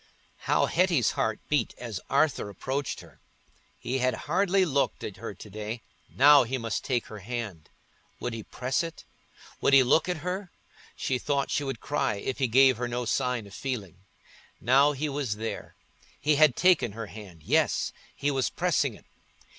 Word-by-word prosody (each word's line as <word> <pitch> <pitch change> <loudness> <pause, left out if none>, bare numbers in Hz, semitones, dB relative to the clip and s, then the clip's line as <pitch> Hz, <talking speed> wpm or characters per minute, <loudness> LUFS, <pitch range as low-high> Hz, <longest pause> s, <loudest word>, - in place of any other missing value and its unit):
How - - +4
Hetty's 170 - +2
heart 110 -1 -1
beat 145 -6 0
as 115 -6 -5
Arthur 140 -6 +2
approached 130 +7 -3
her! - - -18 0.6
He 130 +3 -2
had 130 0 +1
hardly 190 +4 +2
looked 140 -4 0
at - - -6
her - - -7
to - - -11
day: 110 +2 -5 0.3
now 145 +1 +7
he 130 +2 -1
must 115 -3 -3
take 125 -3 0
her 110 - -9
hand. 105 -6 -6 0.5
Would 125 - -3
he 115 - -5
press 125 +4 -2
it? 165 -1 -7 0.6
Would 140 - +3
he 135 -1 +8
look 150 +8 +3
at 180 - -1
her? 185 0 -3 0.4
She 130 -1 -1
thought 140 0 -1
she 145 - 0
would 135 -5 -4
cry 135 -6 0
if 125 +7 -4
he 130 - +2
gave 130 +1 +5
her 120 0 -2
no 120 0 -3
sign 125 -2 0
of 100 - -13
feeling. 110 -11 -4 0.6
Now 135 +5 +4
he 150 +2 -2
was 140 -6 -2
there—he 130 +6 -4
had 150 -3 +5
taken 175 - +3
her 115 +1 -5
hand—yes, 95 -8 -1 0.2
he 145 +1 0
was 135 -3 0
pressing - - 0
it. - - -18
130 Hz, 170 wpm, -28 LUFS, 115-145 Hz, 0.6 s, he